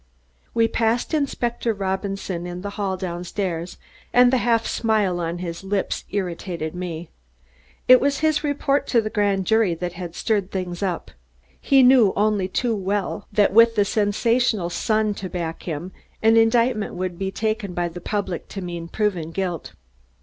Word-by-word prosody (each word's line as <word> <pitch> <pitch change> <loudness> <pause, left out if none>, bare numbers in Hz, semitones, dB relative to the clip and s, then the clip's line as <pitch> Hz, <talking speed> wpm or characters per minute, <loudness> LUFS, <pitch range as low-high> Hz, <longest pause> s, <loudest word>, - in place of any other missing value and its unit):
We 230 -1 +4
passed 230 +5 0
Inspector 240 -5 0
Robinson 190 -3 -3
in 180 +1 -6
the 200 - -4
hall 200 -2 -2
down 175 -2 -4
stairs 175 -2 -3 0.3
and 245 +1 +5
the - - +5
half 230 -1 +2
smile 210 -6 +1
on 170 0 -2
his 175 0 -6
lips 195 0 -2
irritated 175 -4 -3
me. 175 -2 -5 0.8
It 255 0 +8
was 280 +1 +1
his 310 -1 +2
report 285 -1 0
to 240 - +3
the 215 0 -4
grand 200 -3 +1
jury 220 -4 +3
that 175 +1 -4
had 175 -1 -7
stirred 205 -4 0
things 180 -2 -4
up. 185 -4 -2 0.5
He 270 -1 +4
knew 250 -6 +6
only 205 -2 +1
too 230 +4 0
well 200 0 -2
that 205 -1 +3
with 230 +1 +6
the 205 -2 +3
sensational 210 -2 +1
Sun 215 +2 +1
to 185 - -4
back 170 -3 -4
him, 165 +4 -4 0.3
an 225 +1 +5
indictment 225 -1 +3
would 180 -1 -4
be 195 0 -1
taken 215 -2 -2
by 175 0 0
the 175 +1 -8
public 195 -2 -3
to 195 - -6
mean 170 -1 -5
proven 185 -5 -1
guilt. 175 -2 -4
200 Hz, 165 wpm, -23 LUFS, 180-225 Hz, 0.8 s, It